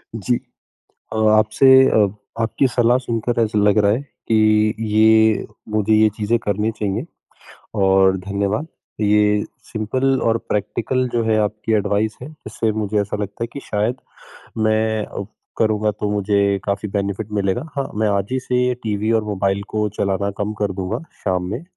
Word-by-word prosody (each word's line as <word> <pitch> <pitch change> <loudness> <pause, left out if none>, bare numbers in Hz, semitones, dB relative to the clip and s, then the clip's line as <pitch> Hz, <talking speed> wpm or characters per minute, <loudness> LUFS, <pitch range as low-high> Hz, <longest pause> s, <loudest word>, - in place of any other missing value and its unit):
जी, 115 +3 0 0.8
अ, - - -4 0.2
आपसे 110 +4 +3 0.2
अ, 105 -2 +4 0.4
आपकी 115 +4 +1
सलाह 120 0 +3
सुनकर 120 -1 -1
ऐसा 105 -1 -1
लग 105 +1 +3
रहा 100 -1 +4
है, 115 +6 0 0.3
कि 110 -1 +3
ये 110 0 +4 0.2
मुझे 110 0 +1
ये 110 0 +5
चीज़ें 110 +2 +1
करनी 105 0 -1
चाहिए। 105 -3 -3 0.8
और 95 0 +4
धन्यवाद, 100 - -2 0.3
ये 105 0 +3 0.3
सिंपल 130 +5 0
और 115 0 +1
प्रैक्टिकल 125 +5 -1
जो 120 -1 -1
है 110 -1 +2
आपकी 105 +1 -2
एडवाइस 105 +1 0
है, 130 - -7
जिससे 110 -6 -3
मुझे 105 -1 -1
ऐसा 100 0 -3
लगता 100 +1 -5
है - - -3
कि 140 - -6
शायद 110 +4 -1 0.6
मैं 110 0 +1
अ, 100 - -6 0.3
करूँगा 110 -1 +2
तो 105 0 -3
मुझे 100 -1 +1
काफ़ी 100 +1 -2
बेनिफिट 100 +1 -3
मिलेगा। 105 +9 -1
हाँ, 140 -1 -2
मैं 110 0 +1
आज 100 -1 0
ही 130 - +1
से 125 0 0
टीवी 110 0 -1
और 110 -1 +1
मोबाइल 100 -1 -1
को 105 -1 -1
चलाना 100 +1 0
कम 105 +1 -2
कर 100 -2 0
दूँगा 95 +5 -3 0.3
शाम 90 -2 0
में, 120 +9 -4
105 Hz, 165 wpm, -20 LUFS, 100-110 Hz, 0.8 s, ये